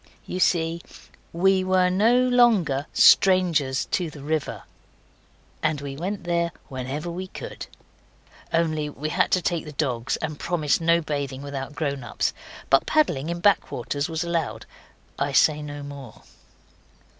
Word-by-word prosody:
You 180 - -4
see, 165 -2 +1 0.5
WE 190 +2 +3
WERE 185 -1 +3
NO 235 +7 +3
LONGER 195 - +3
STRANGERS 170 -8 +4
TO 175 -3 0
THE 150 -2 -11
RIVER. 155 0 -2 1.0
And 155 -2 0
we 140 -1 -6
went 185 +6 -4
there 170 -1 0 0.2
whenever 135 +6 -4
we 185 +2 -5
could. - - -8 0.8
Only 155 -2 0
we 150 +1 -5
had - - +1
to 185 - +1
take 170 -2 -1
the 150 - -9
dogs, 130 -5 -1
and 155 -2 -5
to - - -9
promise 165 -3 +1
no 170 +1 +3
bathing 140 -3 -4
without 140 0 -6
grown 140 -4 -2
ups. 120 - -1 0.4
But 135 - +4
paddling 165 - +1
in 170 0 -3
back 205 +1 +3
waters 140 +6 -3
was 160 0 -2
allowed. 170 -3 -2 0.5
I - - -1
say 150 -1 +4
no 145 -1 -7
more. 140 -5 -10
160 Hz, 150 wpm, -24 LUFS, 140-175 Hz, 1.0 s, STRANGERS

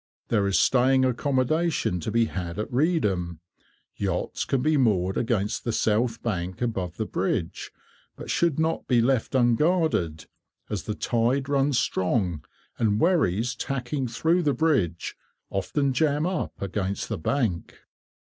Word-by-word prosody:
There 105 -4 +2
is 100 - +2
staying 130 +1 +4
accommodation 130 - 0
to 85 - -4
be 115 +1 +3
had 90 -4 -5
at 105 - -4
Reedham. 105 - 0 0.6
Yachts 95 -3 -2
can 130 -2 0
be 155 +1 +3
moored 95 -8 +2
against 115 0 -1
the 120 - -1
south 115 +2 0
bank 90 -5 -3
above 95 -8 -2
the - - -1
bridge, - - -2 0.5
but - - -9
should 170 -5 +1
not 160 +1 -1
be 125 -2 +3
left 125 +2 +1
unguarded, 125 - +2 0.5
as 100 -4 -3
the 105 - -3
tide 125 +5 0
runs 140 -1 +2
strong, 95 - 0 0.4
and 105 -2 +2
wherries 125 - +2
tacking 135 0 -3
through 160 +9 +1
the 145 -4 +1
bridge 110 - 0 0.4
often 135 +8 0
jam 150 +1 +1
up 185 +1 -3
against 100 0 -2
the - - -3
bank. 105 - -1
120 Hz, 140 wpm, -26 LUFS, 100-140 Hz, 0.6 s, staying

